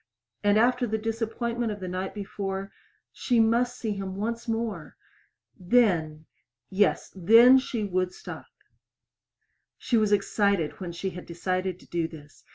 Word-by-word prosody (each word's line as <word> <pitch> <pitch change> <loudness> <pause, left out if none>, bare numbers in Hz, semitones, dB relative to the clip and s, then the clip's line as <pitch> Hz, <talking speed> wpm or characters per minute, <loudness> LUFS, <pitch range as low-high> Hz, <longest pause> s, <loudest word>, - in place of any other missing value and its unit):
And 205 0 +4
after 245 +2 +3
the 220 0 -1
disappointment 225 +1 -2
of 205 - -6
the 185 - -6
night 185 +2 -4
before 195 -1 -5 0.4
She 245 -2 +1
must 240 +2 +2
see 220 - -3
him 195 -2 -4
once 230 +4 -3
more! 225 -9 -3 0.6
Then 175 -7 +2 0.5
yes, 200 +2 +1
then 230 +8 +7
she 240 -4 -3
would 185 -2 -1
stop. - - -9 1.3
She 245 -3 0
was 215 -2 +2
excited 200 -4 +1
when 180 -3 -5
she 185 +3 -4
had 180 0 -9
decided 185 +1 -2
to - - -17
do 170 -1 -2
this. 145 -3 -14
205 Hz, 145 wpm, -27 LUFS, 185-230 Hz, 1.3 s, then